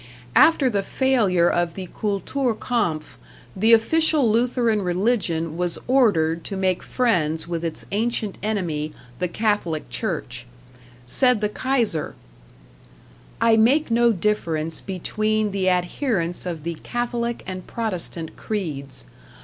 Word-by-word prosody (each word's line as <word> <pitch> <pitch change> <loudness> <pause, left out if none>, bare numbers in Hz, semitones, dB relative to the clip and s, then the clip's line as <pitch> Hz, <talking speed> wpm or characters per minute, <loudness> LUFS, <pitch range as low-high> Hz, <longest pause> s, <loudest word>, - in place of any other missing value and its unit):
After 315 -5 +6
the 205 -5 +1
failure 205 -8 +2
of 175 -1 0
the 190 - -5
"Kultur 220 +4 -1
kampf," 160 - -2 0.4
the 220 +4 +3
official 300 +4 +4
Lutheran 235 -1 +2
religion 180 -4 0
was 175 -1 -1
ordered 170 -11 +3
to 195 - -4
make 185 -1 0
friends 165 -11 0
with 170 -1 -3
its 165 -2 -3
ancient 215 -1 -1
enemy, 170 -8 -2 0.3
the 180 - 0
Catholic 205 -6 -1
Church. 125 - -4 0.6
Said 250 - +3
the 210 0 0
Kaiser: 235 - 0 1.2
I 230 0 +5
make 250 +5 +3
no 235 +1 +4
difference 165 -6 -1
between 215 +3 -1
the 190 -1 +1
adherents 180 - -1
of 165 -4 -5
the 170 +1 -2
Catholic 240 -1 -2
and 185 -1 -6
Protestant 180 -7 -3
creeds. 145 - -4
200 Hz, 120 wpm, -23 LUFS, 170-230 Hz, 1.2 s, After